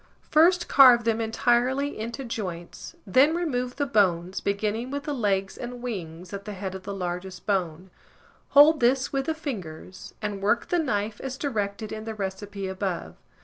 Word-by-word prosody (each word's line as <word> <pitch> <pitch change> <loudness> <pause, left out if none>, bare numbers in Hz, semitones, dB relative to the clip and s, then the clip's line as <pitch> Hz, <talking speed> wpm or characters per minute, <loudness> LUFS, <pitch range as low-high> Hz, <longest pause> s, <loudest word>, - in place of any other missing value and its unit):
First 345 +3 +5
carve 250 -4 +7
them 230 0 +1
entirely 245 +4 +1
into 235 +5 -5
joints, 180 -7 -6
then 270 - +4
remove 250 -8 -2
the 285 - 0
bones, 185 -7 +1
beginning 210 +4 -1
with 285 +1 -4
the 295 - -3
legs 195 -6 -1
and 245 0 -6
wings, 180 -7 -6
at 200 0 -6
the 210 - -5
head 190 -1 -5
of 190 - -7
the 200 +2 -6
largest 180 0 -5
bone; 185 -3 -2 0.6
hold 295 +2 +7
this 260 +3 +2
with 270 0 -1
the 320 - 0
fingers, 190 - -7
and 210 -2 -4
work 210 +4 +1
the 350 - +2
knife 210 -8 -2
as 265 -1 -5
directed 215 -6 -3
in 215 0 -6
the 225 -1 -5
recipe 195 0 -5
above. 190 -2 -3
215 Hz, 170 wpm, -26 LUFS, 190-260 Hz, 0.6 s, carve